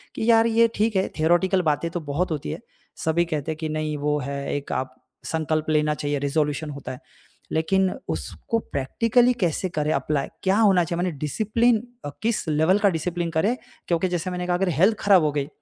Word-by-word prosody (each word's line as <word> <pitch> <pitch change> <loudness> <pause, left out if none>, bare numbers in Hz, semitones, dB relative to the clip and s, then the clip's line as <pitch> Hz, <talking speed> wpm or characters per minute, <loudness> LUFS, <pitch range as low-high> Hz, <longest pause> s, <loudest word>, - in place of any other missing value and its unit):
कि 225 - -1
यार 225 0 +5
ये 230 0 +4
ठीक 215 0 +1
है। 190 - +2
थ्योरेटिकल 175 +4 +3
बातें 165 +3 -2
तो 175 - -3
बहुत 170 +4 0
होती 140 - -3
है, - - -5 0.5
सभी 170 +2 +2
कहते 160 -2 -3
हैं 155 - -5
कि 155 -1 -4
नहीं 155 -1 -2
वो 150 +1 0
है 140 0 -4
एक 145 - -5
आप 130 0 -3 0.3
संकल्प 155 -1 -1
लेना 150 0 +2
चाहिए, 145 -1 -2
रेज़ोल्यूशन 150 +2 -1
होता 140 -3 -7
है। 125 - -9 0.5
लेकिन 190 +4 +2 0.2
उसको 80 - -3
प्रैक्टिकली 230 - +1
कैसे 180 +1 0
करें 155 -2 -1
अप्लाई, 150 -3 -1 0.2
क्या 190 +2 +3
होना 195 -5 +5
चाहिए। 170 +1 -3
माने 180 - 0
डिसिप्लिन 220 - +1 0.2
अ, - - -3
किस 225 -5 -1
लेवल 160 +7 +3
का 205 - +4
डिसिप्लिन 170 0 -2
करें। 195 +10 +1 0.3
क्योंकि 170 +2 +1
जैसे 175 +1 -2
मैंने 180 0 -3
कहा 175 - +2
अगर 190 +1 +1
हेल्थ 185 +8 +3
खराब 195 -5 +5
हो 150 - +2
गई 140 -1 -2
165 Hz, 200 wpm, -24 LUFS, 150-190 Hz, 0.5 s, यार